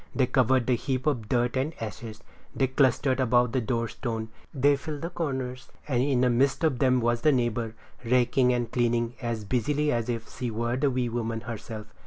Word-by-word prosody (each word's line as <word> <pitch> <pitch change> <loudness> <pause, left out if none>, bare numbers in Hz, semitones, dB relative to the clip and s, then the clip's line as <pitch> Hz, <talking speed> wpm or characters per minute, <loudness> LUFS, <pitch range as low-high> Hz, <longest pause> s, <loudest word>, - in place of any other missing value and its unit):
They 130 - +3
covered 130 -1 +2
the 125 - +2
heap 130 +1 -2
of 120 -8 -1
dirt 120 0 +1
and 135 +5 -1
ashes, 110 0 -7 0.3
they 135 - +2
clustered 130 0 +2
about 125 -1 +3
the 130 0 0
door 115 0 -1
stone; 115 -2 -4 0.2
they 145 0 +3
filled 150 +2 -6
the 170 - -3
corners; 130 -5 -4 0.2
and 125 -4 +1
in 130 -2 +2
the 125 - +4
midst 135 +6 +2
of 145 -6 +2
them 130 -1 +3
was 120 0 +1
the 155 - +5
neighbor, 120 -3 -1 0.3
raking 125 +1 +3
and 120 -2 -1
cleaning 120 -1 +1
as 115 -3 -3
busily 145 +7 0
as 115 0 -1
if 115 -2 -3
she 125 -2 -4
were 120 +2 -1
the 140 +2 +2
wee 125 -1 0
woman 115 -1 -3
herself. 110 -1 -7
125 Hz, 200 wpm, -27 LUFS, 115-130 Hz, 0.3 s, the